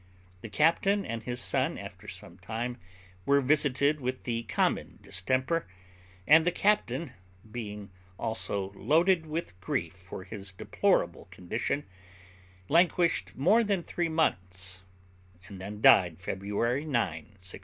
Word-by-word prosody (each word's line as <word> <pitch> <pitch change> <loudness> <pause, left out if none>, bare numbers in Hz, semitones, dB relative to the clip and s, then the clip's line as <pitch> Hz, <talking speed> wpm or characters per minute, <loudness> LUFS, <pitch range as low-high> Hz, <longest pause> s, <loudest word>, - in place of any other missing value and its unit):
The 115 - -7
captain 180 - +3
and 115 0 -4
his 120 +1 -3
son - - 0
after - - -9
some - - -9
time 120 +2 -4 0.4
were 140 +5 +4
visited 145 +1 +2
with 130 0 -3
the 115 -2 -1
common 105 -4 0
distemper, 130 - 0 0.6
and 160 +3 +7
the 180 - +2
captain, 180 -7 +1 0.4
being 105 -4 -6 0.3
also 100 -4 -2
loaded 165 - +2
with 155 - -4
grief 85 -2 -2
for 90 +1 -9
his 100 0 -7
deplorable - - +1
condition, 110 +10 -3 0.8
languished 170 - +2
more 200 - +4
than 200 -5 0
three 175 0 -2
months, 95 - -1 0.7
and 95 -2 -9
then 105 +2 -7
died, 85 -6 +6
February 105 - -1
9, 155 - -7
1661. 90 -3 -3
120 Hz, 125 wpm, -29 LUFS, 95-160 Hz, 0.8 s, and